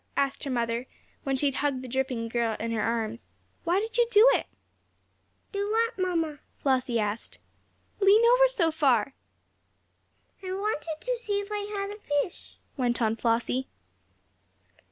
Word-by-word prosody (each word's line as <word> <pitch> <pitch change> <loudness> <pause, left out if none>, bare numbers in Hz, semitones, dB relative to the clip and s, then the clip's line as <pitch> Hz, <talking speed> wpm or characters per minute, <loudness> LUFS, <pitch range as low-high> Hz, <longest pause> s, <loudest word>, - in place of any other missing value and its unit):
asked 275 -1 0
her - - -3
mother, 235 0 -1 0.3
when 270 -1 -1
she 265 - 0
had 275 - +2
hugged 270 -2 -1
the - - -7
dripping 260 -1 -1
little 230 - -4
girl 225 -2 0
in 230 +1 -2
her 225 -2 0
arms. 230 0 -2 0.3
"Why 350 +3 +3
did 445 +2 -4
you 475 - +5
do 435 +1 +7
it?" - - 0 1.0
"Do 405 0 -2
what, 460 +2 +2
mamma?" 330 -5 0 0.2
Flossie 255 -3 +1
asked. 210 +1 -3 0.6
"Lean 415 +3 +6
over - - +6
so 370 -10 +1
far." 270 -6 +2 1.3
"I 375 -1 -4
wanted 375 -6 -2
to - - -1
see 415 -4 -1
if 405 0 -6
I 420 - -1 0.2
had 395 0 -3
a 415 - -9
fish," 290 -2 -3 0.2
went 245 -3 0
on 225 -2 +1
Flossie. 235 +3 0
285 Hz, 160 wpm, -28 LUFS, 240-405 Hz, 1.3 s, do